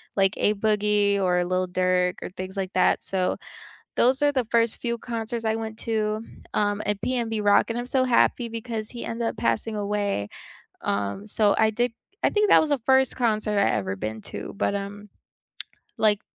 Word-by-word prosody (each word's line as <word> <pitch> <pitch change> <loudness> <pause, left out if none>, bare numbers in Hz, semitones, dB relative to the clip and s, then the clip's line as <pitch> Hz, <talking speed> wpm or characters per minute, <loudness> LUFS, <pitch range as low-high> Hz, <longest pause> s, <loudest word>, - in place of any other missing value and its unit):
like 195 0 +3
A-Boogie 210 -1 +2
or 180 -1 +2
Lil 185 0 0
Durk 180 0 +1
or - - -5
things 185 +1 -6
like 190 -1 -3
that, - - +3
so 185 -1 -1 0.6
those 260 +3 +3
are 290 0 +4
the 255 -5 0
first 230 -1 +2
few 235 -1 -2
concerts 230 0 -4
I 220 0 +1
went 220 -1 -5
to, 215 -1 -1 0.3
um, 205 0 +1
and 205 -1 0
PnB 230 -4 -1
Rock, 205 +2 +4
and 230 - -1
I'm 240 - -2
so 260 0 +2
happy 245 -1 +2
because 225 -1 -5
he 240 - -7
ended 230 0 -2
up - - -5
passing 115 - -1
away. 205 - -1 0.5
Um, 100 - -2
so 210 -1 +2
I 220 0 +4
did 240 +2 0 0.3
I - - +5
think 420 -1 +2
that - - +7
was 315 - -1
the 285 - +2
first 265 0 +4
concert 215 -4 0
I - - +3
ever 95 -2 -1
been 110 +3 -5
to, - - -6
but, 200 - 0
um 200 +1 -6 0.9
like, 210 -1 +3
210 Hz, 185 wpm, -25 LUFS, 195-230 Hz, 0.9 s, that